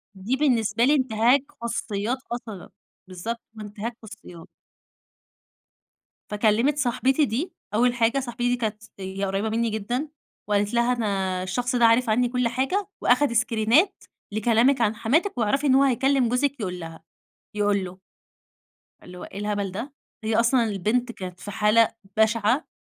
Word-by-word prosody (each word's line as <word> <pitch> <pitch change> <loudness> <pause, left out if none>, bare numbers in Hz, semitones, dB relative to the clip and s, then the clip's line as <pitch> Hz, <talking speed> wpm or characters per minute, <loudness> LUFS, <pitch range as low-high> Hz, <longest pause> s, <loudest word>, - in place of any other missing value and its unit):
دي 200 +7 -2
بالنسبة 235 -6 +1
لي 285 - +4
إنتهاك 255 +1 +3 0.2
خصوصيات 235 0 -2
أصلًا. 220 -6 -6 0.4
بالضبط. 205 +6 -5 0.2
وإنتهاك 215 +2 -6
خصوصيات. 200 -6 -12 1.8
فكلِّمت 220 +7 +2
صاحبتي 265 +2 +2
دي، 280 - -3 0.2
أول 240 +3 +3
حاجة 235 +2 +2
صاحبتي 245 -1 -2
دي 245 - +2
كانت 220 -3 -3
س - - -16
هي 190 +1 -4
قريّبة 195 +3 -1
منّي 230 +1 0
جدًا 240 +8 -3 0.4
وقالت 205 0 0
لها: 235 +1 +2
"أنا 195 -5 -1
الشخص 245 +7 -2
ده 240 -1 +4
عارف 230 +1 +4
عنّي 245 +3 +2
كل 250 -1 0
حاجة 265 - -1
وأخِد 255 +2 +3
اسكرينات 235 - +2 0.3
لكلامِك 235 +4 +2
عن 215 -1 +2
حماتِك 280 - 0
واعرفي 275 +6 +1
إن 260 - +5
هو 275 - +5
هيكلّم 270 -1 +2
جوزِك 270 +2 0
يقول 180 -3 -4
لها 165 -1 -9 0.5
يقول 205 -2 +1
له." 180 +1 -9 1.0
اللي 180 0 -11
هو - - -8
إيه 195 - -9
الهبل 205 -2 -2
ده؟! 230 +9 -6 0.3
هي 220 0 0
أصلًا 235 +1 +3
البنت 225 +4 -1
كانت 180 -3 -8
في 205 - -7
حالة 215 +2 +4 0.3
بَشِعَة، 220 +4 +2
230 Hz, 150 wpm, -24 LUFS, 210-250 Hz, 1.8 s, إن